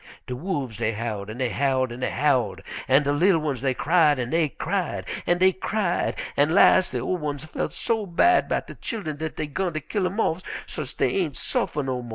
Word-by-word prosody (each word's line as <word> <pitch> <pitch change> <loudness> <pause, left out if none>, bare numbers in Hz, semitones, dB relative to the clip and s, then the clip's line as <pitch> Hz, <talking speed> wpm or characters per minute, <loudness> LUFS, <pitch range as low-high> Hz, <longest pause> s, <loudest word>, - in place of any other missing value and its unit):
"De 125 - -4
wolfs 140 - -3
dey 115 - 0
howled 105 -2 -4
an' 110 - -7
dey 125 -2 0
howled 130 +2 +1
an' 120 - -7
dey 130 - -1
howled, 135 -3 +1 0.3
an' 135 +3 +5
de 140 - +1
li'l 170 +5 +4
ones 145 -6 -2
dey 130 -2 0
cried 155 -1 +3
an' 125 -1 -3
dey 165 -2 +2
cried - - -2 0.2
an' 175 - +3
dey 185 +1 +5
cried, 190 -1 -1 0.2
an' 145 +4 +3
las' 185 -2 +6
de 125 - -3
ol' 155 +9 -1
ones 145 -4 -4
felt 155 - -3
so 220 -3 -1
bad 345 - +3
'bout - - 0
de - - -9
chillen 195 - -5
dat 160 0 -4
dey 155 - -2
'gun 175 +4 -2
ter 155 - -2
kill 185 +5 -1
'em 195 +5 -4
off 175 -4 +1 0.2
so's't - - -6
dey - - +1
ain' 165 -7 -1
suffer 150 - -1
no 130 -2 -2
mo'. 120 - -9
150 Hz, 225 wpm, -25 LUFS, 130-180 Hz, 0.3 s, las